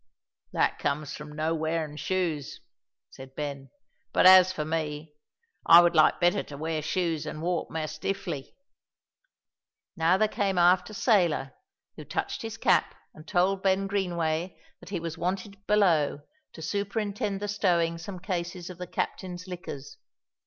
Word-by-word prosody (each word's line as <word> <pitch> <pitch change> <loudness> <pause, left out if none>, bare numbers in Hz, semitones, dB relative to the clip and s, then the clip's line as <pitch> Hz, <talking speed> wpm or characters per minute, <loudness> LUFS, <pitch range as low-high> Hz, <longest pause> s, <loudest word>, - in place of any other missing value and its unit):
"That - - +1
comes 145 +1 -2
from 150 0 -9
no' 155 +2 -1
wearin' 160 -1 -2
shoes," 165 -4 -2 0.5
said 135 0 -12
Ben; 140 -2 -5 0.4
"but - - +3
as 185 0 +9
for 155 -5 -3
me, 155 -1 -3 0.5
I 170 - +10
would 175 0 +4
like 155 -2 +4
better 175 0 +3
to 140 - -10
wear 160 +1 -2
shoes 165 0 -1
an' - - -5
walk 175 +1 -2
mair 160 -1 -3
stiffly." 155 -1 -4 1.4
Now 165 +3 +3
there 215 - +3
came 195 -3 -1
aft 180 +3 +4
a 215 - -9
sailor, 175 - +2 0.4
who - - -7
touched - - -3
his - - -6
cap - - +2 0.2
and 155 - -14
told 190 +2 +1
Ben 195 0 +2
Greenway 175 -3 -1 0.2
that - - -13
he 195 - -2
was 165 0 -6
wanted 195 +3 -4
below 170 -9 +3 0.3
to 160 - -10
superintend 200 +2 -2
the 205 - -3
stowing 170 -5 +1
some 185 +3 -7
cases 175 -1 -4
of 180 - -12
the 180 - -5
captain's 180 0 -4
liquors. 170 -6 -8
175 Hz, 150 wpm, -28 LUFS, 155-190 Hz, 1.4 s, I